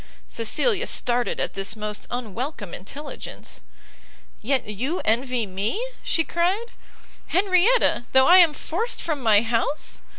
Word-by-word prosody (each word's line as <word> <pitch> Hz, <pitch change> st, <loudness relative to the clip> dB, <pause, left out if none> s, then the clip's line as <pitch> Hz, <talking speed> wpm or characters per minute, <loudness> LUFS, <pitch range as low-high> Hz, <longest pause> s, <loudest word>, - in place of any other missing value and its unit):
Cecilia 300 Hz, -, +1 dB
started 245 Hz, 0 st, +1 dB
at -, -, -1 dB
this 195 Hz, +1 st, -2 dB
most 210 Hz, -1 st, -5 dB
unwelcome 240 Hz, -, -5 dB
intelligence; 285 Hz, +11 st, -8 dB, 0.8 s
"Yet 260 Hz, +1 st, 0 dB
you 255 Hz, -, -3 dB
envy 240 Hz, +1 st, +1 dB
me," 200 Hz, -, -2 dB, 0.2 s
she 325 Hz, -, +1 dB
cried, 375 Hz, +9 st, -1 dB, 0.6 s
"Henrietta, 370 Hz, -, +3 dB
though 265 Hz, 0 st, +5 dB
I 355 Hz, +5 st, +7 dB
am 330 Hz, -4 st, +5 dB
forced 440 Hz, +9 st, -2 dB
from 305 Hz, -4 st, -3 dB
my 220 Hz, -3 st, +4 dB
house! 230 Hz, +6 st, -2 dB
260 Hz, 125 wpm, -23 LUFS, 220-340 Hz, 0.8 s, I